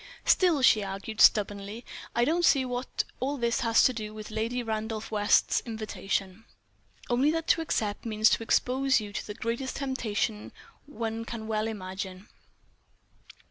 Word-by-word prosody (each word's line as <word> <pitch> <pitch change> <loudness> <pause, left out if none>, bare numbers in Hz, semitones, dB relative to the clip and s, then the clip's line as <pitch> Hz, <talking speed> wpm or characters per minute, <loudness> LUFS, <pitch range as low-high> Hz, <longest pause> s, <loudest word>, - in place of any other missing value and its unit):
"Still," 340 -7 +4
she 220 -4 +6
argued, 195 +3 -4
stubbornly, 205 +2 +3 0.3
"I 235 - +3
don't 335 +5 +1
see 275 -5 +4
what 250 0 -2 0.2
all 280 +3 -1
this 235 -2 0
has 230 -1 +4
to 255 - +4
do 215 -2 -6
with 215 0 -8
Lady 230 +3 -2
Randolph 220 -1 -4
West's 205 -1 +3
invitation." 200 -2 -4 0.6
"Only 250 +4 +2
that 325 +1 -1
to 330 - +4
accept 210 -10 -2
means 215 -1 +3
to - - +2
expose 260 +3 +2
you 205 -1 -7
to - - -5
the 210 - -6
greatest 235 +3 -3
temptation 225 -6 -2 0.3
one 225 -4 -4
can 230 -1 -6
well 215 0 -1
imagine." 190 -2 -6
225 Hz, 150 wpm, -28 LUFS, 210-250 Hz, 0.6 s, she